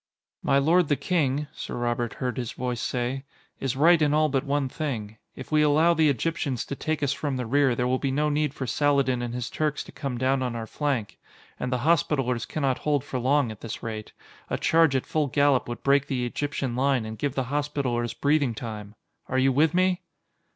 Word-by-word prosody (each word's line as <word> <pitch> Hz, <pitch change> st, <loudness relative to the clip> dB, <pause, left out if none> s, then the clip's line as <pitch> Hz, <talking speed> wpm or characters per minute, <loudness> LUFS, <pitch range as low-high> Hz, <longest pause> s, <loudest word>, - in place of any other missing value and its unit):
"My 135 Hz, -, +2 dB
lord 165 Hz, +4 st, +4 dB
the 145 Hz, -, +2 dB
King," 150 Hz, -4 st, 0 dB
Sir -, -, -6 dB
Robert 120 Hz, -1 st, -1 dB
heard 125 Hz, -1 st, -3 dB
his 120 Hz, -2 st, -4 dB
voice 125 Hz, -2 st, -3 dB
say, 125 Hz, +2 st, -2 dB, 0.4 s
"is 135 Hz, -1 st, -1 dB
right 165 Hz, +4 st, +5 dB
in 150 Hz, -1 st, +3 dB
all 155 Hz, 0 st, +3 dB
but 135 Hz, -1 st, 0 dB
one 145 Hz, -1 st, 0 dB
thing. 120 Hz, -8 st, -4 dB, 0.2 s
If 130 Hz, -, -9 dB
we 155 Hz, 0 st, +4 dB
allow 155 Hz, +3 st, +4 dB
the 160 Hz, -2 st, +3 dB
Egyptians 140 Hz, -1 st, -1 dB
to 140 Hz, -, -5 dB
take 155 Hz, +1 st, -2 dB
us 140 Hz, 0 st, +2 dB
from 145 Hz, -2 st, -3 dB
the 125 Hz, -, -3 dB
rear, 135 Hz, +1 st, +3 dB
there 125 Hz, +1 st, 0 dB
will 130 Hz, +1 st, +1 dB
be 135 Hz, -, -1 dB
no 150 Hz, +3 st, +1 dB
need 150 Hz, -1 st, +1 dB
for 130 Hz, -, -3 dB
Saladin 135 Hz, -1 st, +2 dB
and 120 Hz, -1 st, -3 dB
his 125 Hz, -1 st, -3 dB
Turks 150 Hz, -1 st, -1 dB
to -, -, -13 dB
come 135 Hz, -4 st, -4 dB
down 130 Hz, +2 st, +1 dB
on 125 Hz, -2 st, -2 dB
our 115 Hz, -1 st, -4 dB
flank. 130 Hz, -4 st, -2 dB, 0.4 s
And 125 Hz, -, -2 dB
the 125 Hz, +1 st, -1 dB
Hospitallers 135 Hz, -7 st, +1 dB
cannot 135 Hz, -4 st, -1 dB
hold 145 Hz, -3 st, 0 dB
for 130 Hz, -3 st, -4 dB
long 130 Hz, -1 st, +2 dB
at 105 Hz, -, -11 dB
this 115 Hz, -, -6 dB
rate. 110 Hz, -2 st, -5 dB, 0.4 s
A -, -, -1 dB
charge 160 Hz, -4 st, +3 dB
at 130 Hz, -, 0 dB
full 155 Hz, -2 st, 0 dB
gallop 140 Hz, 0 st, +2 dB
would 120 Hz, -, -6 dB
break 140 Hz, 0 st, +3 dB
the 125 Hz, -3 st, -1 dB
Egyptian 135 Hz, -1 st, -2 dB
line 130 Hz, -2 st, +1 dB
and 110 Hz, 0 st, -6 dB
give 140 Hz, +1 st, -1 dB
the 130 Hz, -, 0 dB
Hospitallers 140 Hz, -5 st, -1 dB
breathing 145 Hz, -5 st, +1 dB
time. 105 Hz, -1 st, -7 dB, 0.3 s
Are 130 Hz, -, -1 dB
you 135 Hz, +1 st, +4 dB
with 155 Hz, +5 st, +3 dB
me?" 185 Hz, 0 st, +2 dB
135 Hz, 215 wpm, -26 LUFS, 125-150 Hz, 0.4 s, right